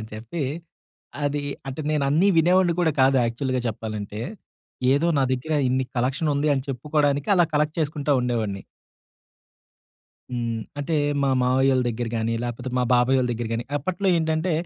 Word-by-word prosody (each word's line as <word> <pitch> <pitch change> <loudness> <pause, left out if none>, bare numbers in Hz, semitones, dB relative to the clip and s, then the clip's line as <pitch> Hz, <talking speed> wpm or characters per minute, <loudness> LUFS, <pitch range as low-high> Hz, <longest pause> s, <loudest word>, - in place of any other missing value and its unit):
అని 110 - -7
చెప్పి, 115 +9 -5 0.8
అదీ 145 0 -1 0.3
అంటే, 135 +3 -5
నేనన్నీ 150 +4 +2
వినేవాడిని 175 +1 +4
కూడా 165 -3 +2
కాదు, 135 +1 +5
యాక్చువల్‌గా 130 +2 -1
చెప్పాలంటే. 105 -1 -5 0.7
ఏదో 145 +5 +2
నా - - +3
దెగ్గర 130 +5 -2
ఇన్ని 130 +1 +1
కలెక్షనుంది 140 +4 0
అని 135 - -1
చెప్పుకోడానికి, 145 +2 0
అలా 175 -2 +5
కలెక్ట్ 150 +2 +1
చేసుకుంటా 150 -1 0
ఉండేవాడిని. 110 -5 -2 1.7
హ్మ్. 115 -2 -2 0.2
అంటే, 150 +3 -1 0.3
మా 140 - +2
మామయ్యోళ్ళ 130 +1 +3
దెగ్గర 120 0 -3
గాని, 115 +1 -1
లేపోతే 120 +1 -4
మా 125 - +2
బాబాయోళ్ళ 125 +1 +3
దెగ్గర 120 0 -3
గాని, 115 +1 -3
అప్పట్లో 185 +4 -1
ఏంటంటే, 160 +2 0
135 Hz, 140 wpm, -24 LUFS, 120-150 Hz, 1.7 s, కాదు